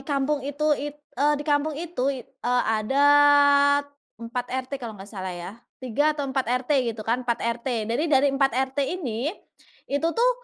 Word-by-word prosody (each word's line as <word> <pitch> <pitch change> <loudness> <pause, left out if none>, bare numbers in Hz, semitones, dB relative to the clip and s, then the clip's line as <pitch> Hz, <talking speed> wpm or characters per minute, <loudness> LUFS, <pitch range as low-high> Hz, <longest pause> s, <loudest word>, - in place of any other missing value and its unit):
kampung 280 +1 -1
itu 290 +3 0
it 290 0 -3 0.2
eee, 290 +4 +2
di 290 - -6
kampung 290 0 0
itu 320 -5 -2
i 265 -4 -3
eee, 250 -1 -1 0.2
adat 285 +2 +5 0.3
4 235 +2 -4
RT 260 +1 -4
kalau 225 -4 -7
nggak 195 +2 -12
salah 190 -3 -5
ya. 180 - -7 0.2
3 290 +5 0
atau 290 - -2
4 265 -2 -2 0.2
RT 265 -3 +1
gitu 220 -2 -5
kan, 235 +3 0
4 240 -2 -1
RT. 235 -1 -2
Dari 240 +9 -1
dari 275 -1 +3
4 275 -3 +1 0.2
RT 285 - -1 0.2
ini, 255 -6 -3 0.6
itu 285 +4 -1
tuh, 485 +2 +4
275 Hz, 180 wpm, -25 LUFS, 240-290 Hz, 0.6 s, adat